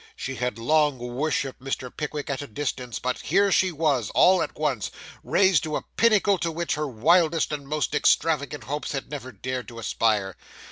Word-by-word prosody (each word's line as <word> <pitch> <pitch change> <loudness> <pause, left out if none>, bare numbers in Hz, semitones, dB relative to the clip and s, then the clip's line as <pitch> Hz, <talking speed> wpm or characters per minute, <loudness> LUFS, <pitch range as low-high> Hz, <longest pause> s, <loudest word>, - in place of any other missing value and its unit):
She 135 - -5
had 125 -3 -2
long 150 +3 +2
worshipped 130 +2 -2
Mr. 130 -1 -4
Pickwick 150 -1 -4
at 140 - -3
a 145 - -7
distance, 125 0 -4
but 125 +1 -2
here 195 +5 +2
she 185 0 +3
was, 145 - 0
all 185 0 +6
at - - -4
once, 140 -9 -1 0.3
raised 190 -5 +3
to 155 -1 -3
a - - -3
pinnacle 205 -4 +3
to 165 - -1
which 170 +1 -2
her 150 0 -2
wildest 160 +7 +2
and 145 -2 -5
most 150 -2 -1
extravagant 150 -1 +1
hopes 145 +4 -4
had 135 +1 -5
never 130 -3 -6
dared 130 0 -5
to 115 - -10
aspire. 105 -3 0
145 Hz, 185 wpm, -25 LUFS, 125-155 Hz, 0.3 s, all